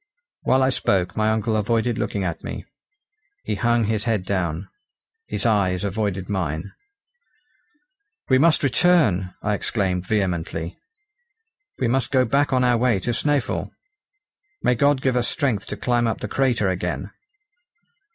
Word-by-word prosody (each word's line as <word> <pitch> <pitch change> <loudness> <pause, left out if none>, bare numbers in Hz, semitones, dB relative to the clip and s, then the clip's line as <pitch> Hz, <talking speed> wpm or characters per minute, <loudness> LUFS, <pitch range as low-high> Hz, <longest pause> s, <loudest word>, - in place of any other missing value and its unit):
While 130 0 +3
I 130 - +3
spoke 95 -7 0
my 110 0 +2
uncle 110 0 0
avoided 115 +2 0
looking 100 - -2
at 85 -3 -3
me; - - -6 0.8
he - - -2
hung 120 +3 +2
his 110 0 -1
head 110 -5 0
down; 90 -2 -2 0.6
his - - -4
eyes 100 -4 +2
avoided 100 -2 -2
mine. 90 -2 -3 1.6
"We 130 -1 +4
must 160 +1 +4
return," 130 - +3
I 105 - +1
exclaimed 95 -3 -1
vehemently; 85 -4 -1 1.0
"we 130 - 0
must 125 +1 0
go 130 -2 +3
back 140 +5 +1
on 130 -1 +3
our 120 -2 +3
way 120 -5 +2
to 120 - -1
Snæfell. 140 +1 0 0.9
May 125 - +4
God 140 +2 +2
give 130 -2 +2
us 120 -1 +1
strength 120 -10 -1
to - - -5
climb 120 -1 +1
up 115 - -2
the - - -4
crater 125 -6 +1
again!" 90 +1 -3
110 Hz, 145 wpm, -23 LUFS, 95-125 Hz, 1.6 s, We